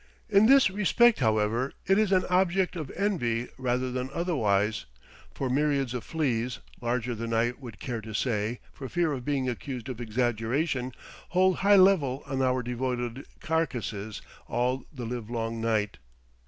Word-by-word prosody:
In 205 +1 +6
this 270 -6 +6
respect, 215 +4 +4
however, 110 +2 +1
it 195 +2 +4
is 215 -2 +2
an 185 -1 +3
object 185 0 +2
of 155 -6 -5
envy 125 - 0
rather 125 0 0
than 125 +1 -3
otherwise, 110 - 0 0.4
for 135 - -3
myriads 140 -1 +1
of 125 - -4
fleas, 125 -7 -1 0.2
larger 120 0 -1
than 115 0 -3
I 115 +1 +2
would 125 -4 -11
care 120 -3 -4
to 110 -1 -7
say, 115 -1 -1
for 135 -2 -7
fear 170 -3 +1
of 130 -3 -5
being 140 -3 0
accused 125 0 -4
of 125 -2 -5
exaggeration, 120 +4 -1 0.4
hold 185 0 +3
high 200 +1 +5
revel 160 -9 +4
on 135 -2 -2
our 130 -1 +1
devoted 125 0 -3
carcasses 110 - -2 0.2
all 125 +2 -1
the 125 -5 -6
livelong 115 -1 -3
night. 110 - 0
125 Hz, 155 wpm, -28 LUFS, 115-160 Hz, 0.4 s, In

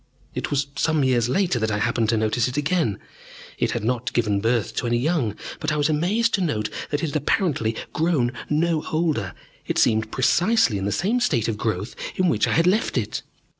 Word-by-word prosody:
It - - -3
was 140 -1 +1
some 155 -1 +1
years 120 -3 +2
later 175 -3 +1
that 110 0 0
I 105 - 0
happened 115 +1 0
to 115 - +2
notice 110 +1 +1
it 125 - -4
again. 145 - +1 0.6
It - - +1
had - - -3
not 125 +3 -1
given 105 -4 +1
birth 115 0 0
to 120 - 0
any 120 0 +2
young, 130 - 0 0.2
but 155 -1 -1
I - - 0
was 145 +1 +2
amazed 195 +10 +1
to 195 - +2
note 105 -11 -1 0.2
that 145 +1 -2
it 160 - -1
had - - -6
apparently 145 - 0 0.2
grown 155 -7 +1 0.2
no 160 +1 +1
older: 155 - 0 0.3
it - - -1
seemed 110 0 +2
precisely 130 - +2
in 95 - -3
the 100 - 0
same 210 - +1
state 135 - +1
of 115 - -1
growth 105 -1 -3 0.2
in 185 -1 +2
which - - +2
I - - +1
had 165 - +3
left 190 -4 +2
it. 110 -2 -2
130 Hz, 210 wpm, -23 LUFS, 110-165 Hz, 0.6 s, had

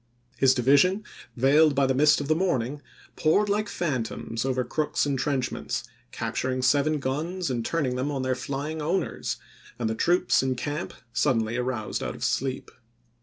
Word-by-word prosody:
His 130 0 +5
division, 145 - +4 0.3
veiled 145 +4 +5
by 140 0 +3
the 130 - +2
mist 150 +3 +5
of 145 - -4
the 155 - +4
morning, 145 -6 -1 0.3
poured 200 +7 +2
like 210 +1 0
phantoms 125 -6 -2
over 130 -1 0
Crook's 150 +3 0
in 140 -1 0
trenchments, 130 -2 -2 0.3
capturing 130 0 -2
seven 145 +4 +3
guns 155 +5 -2
and 120 -2 -1
turning 130 -3 -1
them 130 +3 -1
on 135 -3 -2
their 130 0 +1
flying 140 +4 -4
owners, 170 +6 -1 0.4
and 120 - -1
the 110 - 0
troops 175 +10 +2
in 130 -1 0
camp 145 +5 -4 0.2
suddenly 115 -6 +1
aroused 125 -3 -2
out - - -3
of - - -8
sleep. 135 0 -1
135 Hz, 165 wpm, -26 LUFS, 130-155 Hz, 0.4 s, His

